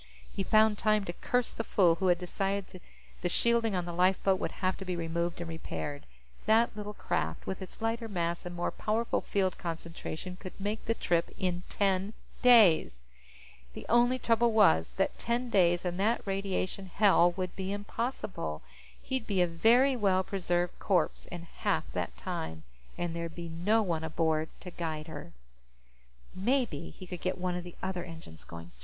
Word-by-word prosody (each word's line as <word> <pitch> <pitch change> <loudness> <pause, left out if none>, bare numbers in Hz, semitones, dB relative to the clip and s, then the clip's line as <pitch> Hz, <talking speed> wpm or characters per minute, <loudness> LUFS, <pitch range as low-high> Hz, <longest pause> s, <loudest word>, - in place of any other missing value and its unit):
He - - -1
found 215 +1 +4
time 215 -2 +2
to 175 - -4
curse 245 +6 -1
the 225 - -3
fool 180 -6 +4
who 190 - +3
had 175 -1 +4
decided 195 +1 -3 0.4
the 175 - 0
shielding 230 +1 +2
on 180 -1 -1
the 175 - -5
lifeboat 185 +2 +3
would - - -3
have 185 0 0
to - - -6
be 180 -1 -3
removed 170 +1 -2
and 170 - -4
repaired. 150 -3 -5 0.4
That 225 +1 +4
little 210 0 -6
craft, 80 0 -2
with 190 - -4
its 190 +4 -9
lighter 225 +1 -1
mass 170 -4 -2
and 175 0 -6
more 175 - -1
powerful 225 +2 0
field 190 -2 0
concentration, 170 +1 -5
could 185 0 -10
make 205 +3 -2
the 230 - +1
trip 170 -5 +1
in 180 -1 -1
ten 195 +1 +1 0.3
days. 190 - +6 0.7
The - - -8
only 240 +2 +4
trouble 235 -1 +3
was 80 - +4
that 195 - 0
ten 240 +1 -1
days 175 -3 +3
in 175 0 -1
that 215 +5 +1
radiation 195 -1 -2
hell 180 -2 +4
would 185 -1 -3
be 190 0 -3
impossible. 205 - -3 0.4
He'd 260 -3 -2
be 200 -3 0
a 180 - +5
very 235 +11 +4
well 195 -5 +2
preserved 175 -2 -1
corpse 180 -5 +1
in 175 -1 -7
half 170 - -1
that - - -3
time, 80 0 -5 0.3
and 175 -1 -2
there'd 170 -1 -4
be 170 -1 -6
no 200 +7 +2
one 165 -5 -1
aboard 160 0 0
to 180 - -8
guide 160 -3 -4
her. 145 - -8 1.0
Maybe 200 - 0
he 185 - -11
could 180 -1 -7
get 185 - -1
one 180 -1 -1
of 180 - -4
the 175 -1 -10
other 185 -2 -2
engines 160 - -10
going! 85 +5 -10
185 Hz, 175 wpm, -30 LUFS, 170-210 Hz, 1.0 s, days